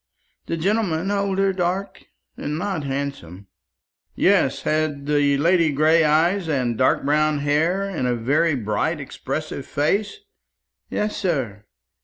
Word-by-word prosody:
The 165 - -2
gentleman 190 -1 0
older, 195 -1 +1
dark, 185 +2 -3 0.3
and 150 +1 -4
not 185 -3 -2
handsome." 135 -10 -5 0.7
"Yes. - - +2
Has 155 -1 0
the 145 -1 +2
lady 165 +1 +3
gray 155 +3 +4
eyes, 165 +4 +2
and 125 -5 0
dark 130 +2 +2
brown 150 +1 +2
hair, 155 +7 +1
and 190 -10 -2
a 125 - +1
very 145 +7 +1
bright 120 +8 -1
expressive 140 +1 -5
face?" 195 - 0 0.7
"Yes, 210 0 -2
sir." 125 - -2
155 Hz, 125 wpm, -22 LUFS, 140-180 Hz, 0.7 s, gray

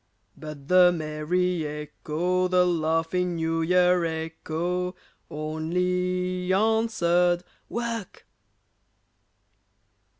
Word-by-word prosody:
But 150 -3 -9
the 180 0 +6
merry 165 +2 -1
echo, 155 +4 -2
The 180 0 +3
laughing 170 +1 0
New 165 0 -1
Year 180 +1 +3
echo, 165 +2 -3 0.3
Only 180 +4 -1
answered, 185 -5 +2 0.3
"Work!" 230 -4 -4
180 Hz, 70 wpm, -26 LUFS, 160-180 Hz, 0.3 s, the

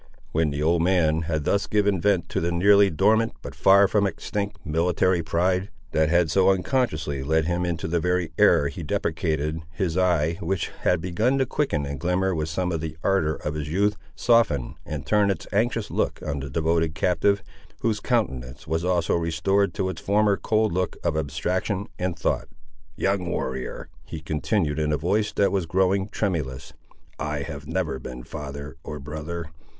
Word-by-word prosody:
When 80 0 +1
the 75 +1 -2
old 85 +1 +3
man 85 -3 +2
had 80 -2 0
thus 100 -1 +1
given 100 -3 +1
vent 100 -3 +2
to - - -1
the 85 +1 0
nearly 100 +3 +5
dormant, 110 +8 +2
but - - -7
far 100 +1 +6
from 100 0 +2
extinct, 100 +2 -4
military 85 +3 +2
pride, 90 +4 0 0.2
that 80 0 +2
had 85 -2 +3
so 95 +2 +4
unconsciously 90 - 0
led 80 +3 +1
him 90 +1 0
into 85 -1 -2
the 85 +1 +1
very 90 -1 0
error 70 - +5
he 70 - -6
deprecated, 75 +1 -1
his 95 -2 -1
eye, 85 -3 +2
which 90 +1 -1
had 90 -2 +1
begun 105 +10 +1
to 135 - +2
quicken 120 - -1
and 70 -1 -5
glimmer 90 +4 +1
with 80 -1 -2
some 90 +2 -1
of 80 -2 -2
the 80 -1 -5
ardour 85 -6 +2
of 75 - -1
his 75 -1 -4
youth, 100 +5 +2 0.2
softened 85 - +2
and 75 -2 -5
turned 105 -1 +3
its 85 -5 -2
anxious 115 +1 0
look - - -1
on 70 - -2
the 70 0 -6
devoted 80 +2 0
captive, 95 +4 +2 0.4
whose 110 -2 0
countenance 65 - -2
was 80 +1 -1
also 90 -2 +1
restored 85 +4 +1
to 95 +2 0
its 95 - -5
former 105 0 +3
cold 110 +1 +1
look 90 0 -1
of - - 0
abstraction 90 +7 -1
and 90 -2 -2
thought. 80 - -1 0.5
"Young 95 0 0
warrior," 65 -7 -4 0.2
he 80 - -6
continued 80 0 -1
in 75 0 0
a 75 - +2
voice 100 +8 0
that 100 - +2
was 95 -4 0
growing 95 +3 +1
tremulous, 70 - -3 0.5
"I 75 -2 -2
have 75 -2 -7
never 80 -5 -2
been 65 -1 -8
father, 70 +3 -7
or 75 - -6
brother. 75 +3 -6
85 Hz, 180 wpm, -25 LUFS, 75-95 Hz, 0.5 s, far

